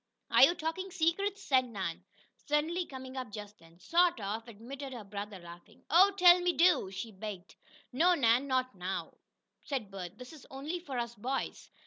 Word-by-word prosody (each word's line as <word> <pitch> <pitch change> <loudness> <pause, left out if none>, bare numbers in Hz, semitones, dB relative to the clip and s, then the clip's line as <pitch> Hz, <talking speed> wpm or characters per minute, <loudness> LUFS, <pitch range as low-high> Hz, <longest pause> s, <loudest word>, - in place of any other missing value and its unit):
"Are - - +6
you 345 - +8
talking 340 +4 -3
secrets?" 370 +2 -1
asked 260 -1 +5
Nan, 190 -7 -4 0.3
suddenly 320 +4 -1
coming 260 -1 -9
up 255 -5 -5
just 210 0 -9
then. 165 0 -19
"Sort 340 - +2
of," 215 +3 -4
admitted 260 +5 -8
her 235 -3 -7
brother, 200 0 -6
laughing. 175 -1 -14
"Oh, 365 +5 +7
tell 355 -1 +8
me 355 0 +2
do!" 345 - +4
she 195 +4 -6
begged. 195 -2 -8 0.4
"No, 345 +7 +4
Nan. 245 -1 +3
Not 255 -1 0
now," 185 0 -5 0.4
said 250 -9 -4
Bert. 190 0 -7
"This 250 +4 -10
is 300 - -14
only 290 +6 -4
for 280 -7 -6
us 235 -1 -2
boys." 255 +5 -4
255 Hz, 175 wpm, -32 LUFS, 205-330 Hz, 0.4 s, you